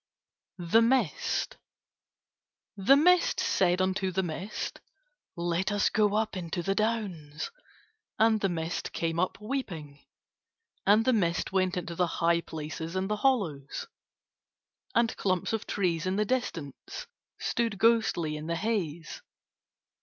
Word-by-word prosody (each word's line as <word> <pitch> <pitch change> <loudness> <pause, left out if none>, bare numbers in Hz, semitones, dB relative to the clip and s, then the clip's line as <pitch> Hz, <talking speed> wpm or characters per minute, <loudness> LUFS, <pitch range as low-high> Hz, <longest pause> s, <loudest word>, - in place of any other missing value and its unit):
THE 175 +6 +3
MIST 230 - +1 1.2
The 205 +7 +5
mist 355 +5 +4
said 180 -1 +2
unto 190 0 0
the 190 +1 0
mist: 180 +5 -4 0.6
"Let 175 +3 0
us 205 0 +2
go 210 -2 +3
up 220 -1 0
into 175 -1 -3
the 195 - +1
Downs." 200 - -2 0.7
And 220 -1 +4
the 195 - +2
mist 165 -1 -3
came 165 0 -1
up 185 +2 0
weeping. 185 - -5 0.9
And 215 +3 +5
the 255 - +4
mist 170 -6 +1
went 185 -1 +1
into 170 -1 -4
the 180 +1 +1
high 170 0 +3
places 160 +2 -6
and 190 +2 -1
the 210 - +1
hollows. 195 - 0 1.1
And 235 -1 +3
clumps 185 +1 0
of 225 - -2
trees 180 -3 0
in 185 - 0
the 210 +1 +1
distance 210 - -3 0.3
stood 230 -4 -1
ghostly 220 -8 +2
in 150 +1 -6
the 170 - -1
haze. 175 - -2
190 Hz, 130 wpm, -29 LUFS, 170-220 Hz, 1.2 s, The